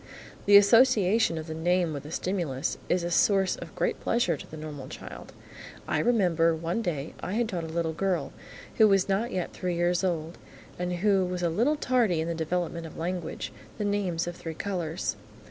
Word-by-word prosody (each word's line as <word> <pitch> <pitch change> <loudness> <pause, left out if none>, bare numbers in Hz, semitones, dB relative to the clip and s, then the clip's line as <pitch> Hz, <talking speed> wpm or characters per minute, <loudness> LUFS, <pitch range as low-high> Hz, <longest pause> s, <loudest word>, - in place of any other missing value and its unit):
The 200 0 +9
association 220 -3 +5
of 155 - -5
the 160 - -5
name 175 +1 +1
with 140 - -4
the 145 - -10
stimulus 165 -8 -2
is 180 -1 +2
a 175 - -2
source 195 +2 +3
of - - -10
great - - -1
pleasure 225 -8 +1
to - - -11
the 155 - -9
normal 150 -4 -7
child. - - -9 0.6
I - - +1
remember, 175 -8 +3
one 165 +7 -2
day, 155 -8 -3
I 185 - -4
had 235 +1 +1
taught 175 -6 -3
a - - -6
little 160 0 -1
girl, 180 -3 -1 0.4
who 220 - +7
was 195 -2 +3
not 200 +5 0
yet 180 -2 -3
three 180 -1 -2
years 175 +1 +1
old, 170 -2 -2 0.4
and 180 0 -1
who 195 -2 +4
was 180 0 -3
a 170 - +2
little 235 - +2
tardy 245 - +1
in 160 - -1
the 170 - -1
development 165 0 -2
of - - -12
language, 175 +1 -4 0.2
the 210 - -2
names 195 -5 0
of 175 0 -5
three 165 -2 -7
colours. 175 -3 -3
175 Hz, 195 wpm, -28 LUFS, 165-200 Hz, 0.6 s, The